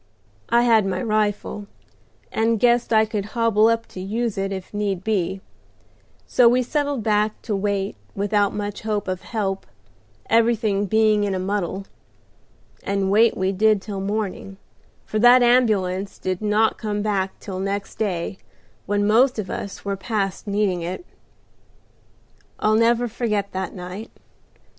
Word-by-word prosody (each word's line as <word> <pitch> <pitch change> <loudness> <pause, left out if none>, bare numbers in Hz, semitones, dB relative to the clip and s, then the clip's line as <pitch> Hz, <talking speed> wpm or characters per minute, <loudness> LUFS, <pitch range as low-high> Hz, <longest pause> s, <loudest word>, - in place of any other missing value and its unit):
I 235 +1 +4
had 225 -3 +4
my 190 - -1
rifle, 210 -2 -1 0.6
and 225 0 +1
guessed 240 0 +3
I 220 -1 +5
could 215 -2 -3
hobble 225 -2 +4
up 230 0 +1
to - - -9
use 220 +3 -2
it 195 0 -2
if 190 0 -6
need 200 -3 -2
be; 190 -3 -1 0.8
so 245 -2 +5
we 250 +1 +2
settled 285 -2 -1
back 210 0 +1
to 215 - -2
wait 195 - -1 0.2
without 205 0 +1
much 205 -1 -4
hope 210 -2 -2
of 185 -1 -3
help, 195 -4 -3 0.6
everything 225 -3 +2
being 215 0 +3
in 200 -2 -1
a - - -2
muddle. 195 0 -2 1.0
And 195 -1 -1
wait 225 +3 +4
we 190 +1 +1
did 215 +2 +3
till 195 0 -6
morning, 195 -1 -3 0.5
for 215 - -2
that 245 +2 +7
ambulance 205 -6 +2
did 185 0 -3
not 215 +1 +2
come 210 -1 -2
back 195 -3 -1
till 190 -2 -6
next 195 +1 -4
day, 190 -3 -2 0.5
when 205 0 +1
most 245 +5 +4
of 210 -4 -4
us 200 - -6
were 200 0 -1
past 195 0 -3
needing 200 -3 0
it. 180 - -5 1.5
"I'll 215 - +2
never 235 +2 +3
forget 210 -3 -2
that 190 -1 -4
night. 185 +4 -7
210 Hz, 150 wpm, -22 LUFS, 195-225 Hz, 1.5 s, that